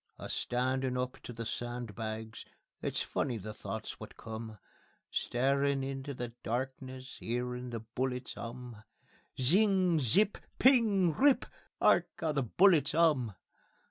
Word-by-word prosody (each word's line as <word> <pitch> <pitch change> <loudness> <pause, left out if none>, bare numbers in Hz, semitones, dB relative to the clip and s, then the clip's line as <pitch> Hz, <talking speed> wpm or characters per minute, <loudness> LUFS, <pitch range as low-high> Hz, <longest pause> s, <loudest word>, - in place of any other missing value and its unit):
A - - -7
standin' 130 +1 0
up 125 0 -3
to - - -8
the 115 -1 -5
sandbags 110 -2 -4 0.4
It's - - -1
funny 125 -4 -1
the 105 +1 -6
thoughts - - -6
wot - - -10
come; 110 -1 -7 0.5
Starin' 140 +2 +1
into 135 +1 -4
the 120 -1 -4
darkness, 130 +2 -4
'Earin' 125 +1 -3
the 115 -2 -4
bullets 125 +3 -3
'um; 120 -1 -7 0.6
_(ZING! 185 - +4
ZIP! 190 - +3 0.2
PING! 215 - +5
RIP! 275 - +4 0.3
'ARK - - +4
'OW 160 -2 0
THE 145 -2 +1
BULLETS 150 - +4
'UM!) 145 - +3
130 Hz, 125 wpm, -32 LUFS, 120-150 Hz, 0.6 s, PING